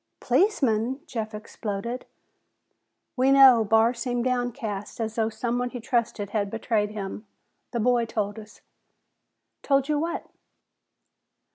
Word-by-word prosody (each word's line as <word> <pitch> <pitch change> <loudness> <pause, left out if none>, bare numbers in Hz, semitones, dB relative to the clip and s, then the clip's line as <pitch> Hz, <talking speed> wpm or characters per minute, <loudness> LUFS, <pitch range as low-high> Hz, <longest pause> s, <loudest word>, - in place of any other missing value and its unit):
"Policeman!" 260 - +1
Jeff 220 -7 -4
exploded. 215 +2 -5 1.1
"We 260 +1 +3
know," 265 -4 +8
Barr 225 +2 +4
seemed 245 0 -2
downcast, 240 -5 -3
as 220 -1 -2
though 225 -1 0
someone 245 +2 -2
he 245 - -6
trusted 225 -4 -1
had 205 -2 -1
betrayed 220 -1 0
him. 210 0 -6 0.4
"The 235 - -2
boy 240 0 +3
told 215 -1 -3
us." 215 -1 -14 1.0
"Told 275 -1 +2
you 300 -1 +1
what?" 335 +2 -3
235 Hz, 120 wpm, -26 LUFS, 215-250 Hz, 1.1 s, know